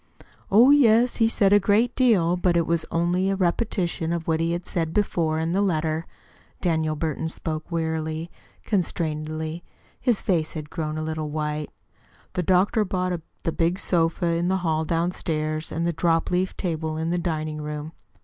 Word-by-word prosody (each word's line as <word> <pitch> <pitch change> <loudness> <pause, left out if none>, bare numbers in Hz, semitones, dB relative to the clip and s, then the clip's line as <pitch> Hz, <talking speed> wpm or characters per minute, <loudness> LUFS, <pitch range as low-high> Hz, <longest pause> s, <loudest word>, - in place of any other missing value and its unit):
"Oh, 230 +7 +7
yes, 245 -4 +5
he 225 -1 +4
said 200 -3 +3
a 205 - +7
great 210 +5 +2
deal 200 -10 +3
but 180 -1 +2
it 170 - +2
was 170 -1 0
only 175 +3 +1
a 195 - +1
repetition 175 -3 0
of 170 -1 -3
what 160 -1 +1
he 165 +1 +1
had 175 +1 -3
said 165 -2 -2
before 165 -6 +1
in 160 +1 -1
the 190 +3 +2
letter." 160 -4 0 0.5
Daniel 160 -3 0
Burton 160 +1 -2
spoke 155 0 -5
wearily, 160 0 -2 0.3
constrainedly. 160 -3 -2 0.4
His 240 -5 +1
face 165 -5 0
had 155 -2 -7
grown 155 -2 -3
a 155 - -2
little 155 -1 -3
white. 150 0 -3 0.6
"The 180 - 0
doctor 185 +5 +3
bought 185 -2 -1 0.3
the 165 - 0
big 170 +2 0
sofa 170 -2 +1
in 170 +1 +1
the 190 +1 +2
hall 160 -1 +1
downstairs, 160 -2 -1
and 165 +1 -1
the 170 - 0
dropleaf 170 +3 0
table 160 -3 -2
in 160 +1 -1
the 175 - 0
dining 155 -3 -3
room." 150 +1 -5
165 Hz, 170 wpm, -24 LUFS, 155-185 Hz, 0.6 s, Oh